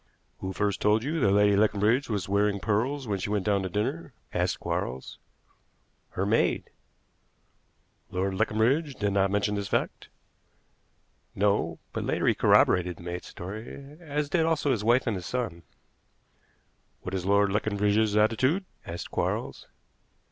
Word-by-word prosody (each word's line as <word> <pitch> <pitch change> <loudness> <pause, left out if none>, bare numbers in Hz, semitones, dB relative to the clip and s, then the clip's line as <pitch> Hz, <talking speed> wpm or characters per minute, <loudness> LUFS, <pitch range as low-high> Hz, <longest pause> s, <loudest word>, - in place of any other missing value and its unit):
"Who 95 - -4
first 100 0 -1
told 105 +2 +3
you 155 +4 -1
that 105 - +3
Lady 105 0 +4
Leconbridge 110 +5 +2
was 105 -4 -2
wearing 100 0 +1
pearls 120 +7 -1
when 100 -2 -1
she 95 - -3
went 105 -2 -1
down 100 -2 +2
to 95 - -3
dinner?" 130 - -3 0.2
asked 90 0 0
Quarles. 65 +1 -4 1.0
"Her 95 - +1
maid." 110 +3 +1 1.4
"Lord 95 +1 -1
Leconbridge 115 - +1
did 100 -2 -1
not 95 -1 +3
mention 105 +1 0
this 100 -1 -2
fact?" - - -2 1.3
"No; 100 +1 +1 0.2
but - - -2
later - - -1
he - - +4
corroborated 90 -2 +3
the - - -12
maid's 90 +1 -5
story; 115 +10 -8
as 150 -3 -2
did 165 +3 +1
also 160 -3 +1
his 110 -5 0
wife 120 +4 +3
and 115 -4 0
his 90 -2 -6
son." 115 -10 -3 1.4
"What 95 - -5
is 95 -2 -2
Lord 100 0 +3
Leconbridge's 105 +1 +1
attitude?" 130 - +2 0.2
asked 85 +1 -7
Quarles. - - -2
105 Hz, 150 wpm, -27 LUFS, 100-120 Hz, 1.4 s, Lady